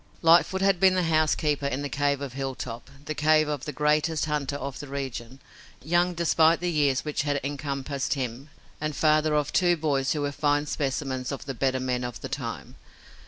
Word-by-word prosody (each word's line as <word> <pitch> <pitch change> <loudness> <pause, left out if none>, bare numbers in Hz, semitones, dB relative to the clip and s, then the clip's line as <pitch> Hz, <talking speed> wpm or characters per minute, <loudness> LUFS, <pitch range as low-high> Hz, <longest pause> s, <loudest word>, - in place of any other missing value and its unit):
Lightfoot 170 +3 +5
had 195 -2 +3
been 190 0 +5
the 185 - +2
housekeeper 155 -3 +1
in 140 +1 -2
the - - -2
cave 140 0 0
of 140 -3 -5
Hilltop, 130 -3 -5 0.2
the 155 - -3
cave 155 +1 +3
of 145 -2 -3
the 150 - -3
greatest 150 +2 +1
hunter 150 -2 -2
of 140 -1 -5
the 145 - -7
region, 135 -2 -6 0.4
young 175 +3 +2
despite 165 -1 +3
the 175 0 -1
years 145 -4 +1
which 150 -1 -1
had 145 0 0
encompassed 140 0 -3
him, 130 +1 -5 0.3
and 155 -1 -2
father 155 0 +3
of 150 -2 0
two 175 -2 +3
boys 140 -4 0
who 150 - -2
were 145 0 -1
fine 145 0 +1
specimens 135 -3 -2
of 140 - -6
the 135 - -4
better 130 +1 0
men 125 -1 -1
of 120 -1 -6
the - - -6
time. - - -6
145 Hz, 195 wpm, -26 LUFS, 135-155 Hz, 0.4 s, Lightfoot